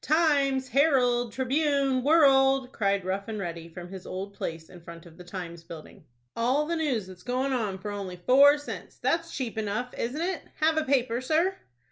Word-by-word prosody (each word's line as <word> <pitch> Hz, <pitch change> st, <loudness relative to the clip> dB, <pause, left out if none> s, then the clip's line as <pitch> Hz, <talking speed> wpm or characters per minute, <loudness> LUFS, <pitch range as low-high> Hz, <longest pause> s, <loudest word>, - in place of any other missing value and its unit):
"'Times,' 280 Hz, -4 st, +2 dB
'Herald,' 250 Hz, -4 st, +3 dB
'Tribune,' 270 Hz, +1 st, +1 dB
'World'!" 270 Hz, -3 st, +4 dB
cried 200 Hz, -4 st, 0 dB
Rough 195 Hz, +2 st, -3 dB
and 220 Hz, -1 st, -4 dB
Ready, 170 Hz, -4 st, -5 dB
from 175 Hz, +1 st, -9 dB
his 190 Hz, -2 st, -9 dB
old 195 Hz, +2 st, -5 dB
place 165 Hz, -4 st, -6 dB
in 180 Hz, -, -14 dB
front 170 Hz, 0 st, -11 dB
of 165 Hz, -2 st, -15 dB
the 180 Hz, -, -12 dB
"Times" 175 Hz, -2 st, -7 dB
building. 165 Hz, -2 st, -12 dB, 0.3 s
"All 255 Hz, +6 st, +1 dB
the 335 Hz, +2 st, -2 dB
news 280 Hz, -, -1 dB
that's 185 Hz, -1 st, -12 dB
going, 250 Hz, -5 st, -1 dB
for 205 Hz, +2 st, -6 dB
only 195 Hz, -3 st, -5 dB
four 275 Hz, +10 st, +6 dB
cents! 290 Hz, -, -8 dB
That's 335 Hz, 0 st, 0 dB
cheap 240 Hz, -5 st, -3 dB
enough, 215 Hz, +4 st, -3 dB
isn't 245 Hz, +6 st, -3 dB
it? 360 Hz, +3 st, -2 dB, 0.2 s
Have 315 Hz, 0 st, +2 dB
a 315 Hz, -, +1 dB
paper, 250 Hz, -3 st, +1 dB
sir?" 325 Hz, +8 st, +1 dB
245 Hz, 180 wpm, -27 LUFS, 190-280 Hz, 0.3 s, four